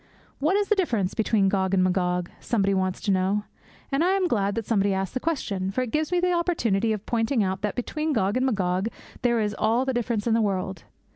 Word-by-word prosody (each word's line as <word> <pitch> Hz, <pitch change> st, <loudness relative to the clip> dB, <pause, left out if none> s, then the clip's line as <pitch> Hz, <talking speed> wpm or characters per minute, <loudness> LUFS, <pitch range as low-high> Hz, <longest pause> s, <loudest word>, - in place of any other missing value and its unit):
'What 310 Hz, +7 st, +2 dB
is 410 Hz, 0 st, +1 dB
the -, -, +4 dB
difference 230 Hz, -, 0 dB
between 215 Hz, -3 st, +2 dB
Gog 190 Hz, 0 st, +1 dB
and 185 Hz, -, +3 dB
Magog?' 180 Hz, -1 st, 0 dB
somebody 200 Hz, -4 st, +1 dB
wants 185 Hz, -1 st, -1 dB
to 200 Hz, -, 0 dB
know; 190 Hz, +2 st, +1 dB, 0.5 s
and 275 Hz, +4 st, +2 dB
I 370 Hz, +2 st, +3 dB
am 385 Hz, -2 st, +2 dB
glad 205 Hz, -, 0 dB
that 230 Hz, -2 st, -3 dB
somebody 200 Hz, -3 st, +1 dB
asked 190 Hz, -1 st, -2 dB
the 255 Hz, -, -1 dB
question, 205 Hz, -, -2 dB
for 255 Hz, +6 st, -1 dB
it 240 Hz, -, -5 dB
gives 310 Hz, +4 st, 0 dB
me 360 Hz, -, +2 dB
the 360 Hz, 0 st, +2 dB
opportunity 235 Hz, -, +1 dB
of 215 Hz, -1 st, -3 dB
pointing 230 Hz, 0 st, +1 dB
out 190 Hz, 0 st, -2 dB
that 210 Hz, -1 st, -2 dB
between 305 Hz, +5 st, -2 dB
Gog 200 Hz, -7 st, +1 dB
and 255 Hz, +1 st, +2 dB
Magog 190 Hz, -3 st, 0 dB, 0.3 s
there 235 Hz, -1 st, +2 dB
is 210 Hz, -1 st, 0 dB
all 235 Hz, +4 st, +2 dB
the 265 Hz, -, 0 dB
difference 235 Hz, -3 st, -1 dB
in 230 Hz, -, +2 dB
the 230 Hz, -, +3 dB
world. 190 Hz, -2 st, -2 dB
215 Hz, 230 wpm, -25 LUFS, 195-260 Hz, 0.5 s, the